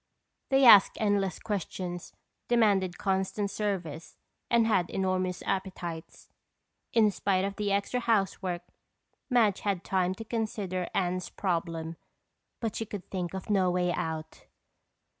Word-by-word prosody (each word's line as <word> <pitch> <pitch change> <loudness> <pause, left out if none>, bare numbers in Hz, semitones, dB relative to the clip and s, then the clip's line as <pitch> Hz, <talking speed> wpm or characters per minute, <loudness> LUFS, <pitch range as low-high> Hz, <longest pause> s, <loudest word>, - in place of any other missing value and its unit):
They 270 -1 +5
asked 210 -5 +8
endless 205 -3 +1
questions, 185 -4 -4 0.4
demanded 200 -6 +3
constant 195 +1 -1
service 175 -8 -4 0.3
and 235 -1 +4
had 195 -6 +2
enormous 185 -1 -1
appetites. 180 -4 -4 0.6
In 220 -3 +4
spite 195 -1 +1
of 200 0 -3
the 205 -1 -1
extra 200 +5 0
housework, 195 -6 0 0.7
Madge 225 -6 +3
had 195 -3 -1
time 185 -1 0
to 225 - -8
consider 210 -5 -2
Anne's 180 -1 0
problem 165 -3 -2 0.6
but 225 -3 -3
she 225 - -2
could 200 -3 -8
think 180 -1 -3
of 190 +3 -5
no 190 -3 +3
way 180 0 +1
out. 160 -1 -5
190 Hz, 125 wpm, -29 LUFS, 180-210 Hz, 0.7 s, asked